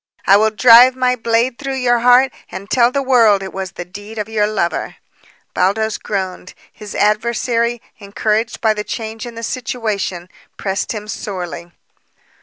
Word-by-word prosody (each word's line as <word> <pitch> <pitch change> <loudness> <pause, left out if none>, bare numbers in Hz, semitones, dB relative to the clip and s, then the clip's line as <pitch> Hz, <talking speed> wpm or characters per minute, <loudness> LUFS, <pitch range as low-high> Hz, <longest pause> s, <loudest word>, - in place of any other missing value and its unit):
"I 195 - +6
will 215 +2 +4
drive 240 +3 +7
my 255 -1 +1
blade 235 +1 0
through 275 -2 -4
your 245 -2 +2
heart 250 +2 +5 0.2
and 190 +2 -8
tell 240 -1 +4
the 275 +1 -1
world 230 -7 +4
it 190 - -8
was 190 -1 -5
the 175 - -7
deed 205 +5 -11
of 210 -1 -3
your 215 -2 0
lover." 200 -5 -2 0.6
Baldos 210 +3 0
groaned. 185 -2 -5 0.2
His 210 -2 -10
adversary, 235 +2 0 0.2
encouraged 215 +3 -2
by 220 -1 +3
the 210 -1 -4
change 225 +1 -6
in 235 - -10
the 230 - -7
situation, 215 -8 -3 0.3
pressed 195 -1 -3
him 210 -2 -6
sorely. 175 -5 -6
220 Hz, 160 wpm, -17 LUFS, 200-240 Hz, 0.6 s, drive